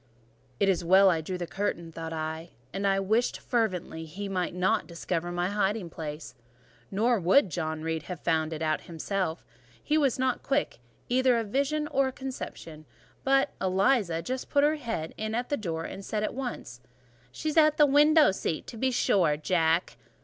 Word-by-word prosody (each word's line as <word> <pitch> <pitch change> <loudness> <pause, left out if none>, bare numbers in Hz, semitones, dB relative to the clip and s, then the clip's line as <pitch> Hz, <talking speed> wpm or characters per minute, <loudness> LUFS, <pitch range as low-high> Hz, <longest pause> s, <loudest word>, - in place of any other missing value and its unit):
"It 200 - +3
is 185 -2 +2
well 190 +3 +6
I 165 -2 0
drew 180 +4 -4
the 175 - -3
curtain," 170 -3 -3
thought 165 0 -6
I; 160 +1 -4 0.2
and 200 +1 -1
I 195 0 +2
wished 220 +5 +1
fervently 185 -8 -2
he 195 +6 -6
might 180 -2 -2
not 195 +4 +1
discover 170 0 -3
my 175 +1 -1
hiding 205 -3 -1
place: 155 -3 -7 0.6
nor 230 +4 +2
would 190 +4 +4
John 160 -2 -3
Reed 160 0 -2
have 180 -3 -5
found 160 -1 0
it 160 0 -4
out 155 -1 0
himself; 170 0 -3 0.4
he 305 +1 +2
was 275 -5 +2
not 260 -1 0
quick 280 - -1 0.3
either 255 0 +3
of 225 -3 -2
vision 280 +5 0
or 270 -1 +1
conception; 210 - -7 0.4
but 270 +1 +3
Eliza 190 -2 +2
just 255 0 -4
put 285 -1 +3
her 305 +1 +3
head 225 - -4
in 220 +1 -3
at 245 +1 -2
the 290 - +1
door, 165 -9 -4
and 195 - -7
said 210 +2 -2
at - - -2
once— 235 - -6 0.5
"She 310 - -3
is 305 - -3
in 310 -1 +7
the 300 - +7
window 295 0 +5
seat, 170 -4 -3
to 230 - -9
be 260 +4 +1
sure, 180 -10 +2
Jack." 165 +1 +1
195 Hz, 185 wpm, -28 LUFS, 165-250 Hz, 0.6 s, in